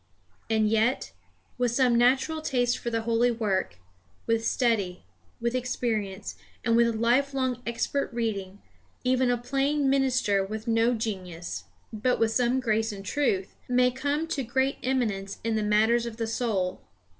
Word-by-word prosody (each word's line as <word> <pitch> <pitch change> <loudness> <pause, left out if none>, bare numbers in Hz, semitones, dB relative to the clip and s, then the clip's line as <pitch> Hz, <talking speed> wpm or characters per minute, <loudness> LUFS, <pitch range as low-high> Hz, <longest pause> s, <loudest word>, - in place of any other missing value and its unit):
And 220 -1 +3
yet, 225 +4 +1 0.5
with 245 -1 +2
some 245 0 +3
natural 265 +6 +3
taste 245 -5 +1
for 235 - -3
the 230 -1 -1
holy 230 +1 +2
work, 205 - -1 0.5
with 230 0 +1
study, 205 -8 0 0.4
with 235 0 -1
experience, 220 -6 -2 0.3
and 230 -1 +3
with 235 -1 +3
life 250 +5 +2
long 260 -2 -1
expert 255 +4 -1
reading, 205 -5 -3 0.4
even 255 0 +2
a 245 - +2
plain 275 +3 +1
minister 255 -7 +2
with 215 +3 -6
no 230 +1 +3
genius, 185 -6 -5 0.3
but 235 +4 +1
with 225 -1 +2
some 245 +2 +2
grace 225 -2 0
and 195 -1 -8
truth, 200 -5 0 0.2
may 250 0 +4
come 285 +5 -1
to 290 - -1
great 265 +3 0
eminence 215 -7 -1
in 225 0 0
the 215 - +1
matters 220 +3 +3
of 225 -1 -7
the 230 - -1
soul. 220 -5 -1
235 Hz, 155 wpm, -27 LUFS, 215-255 Hz, 0.5 s, may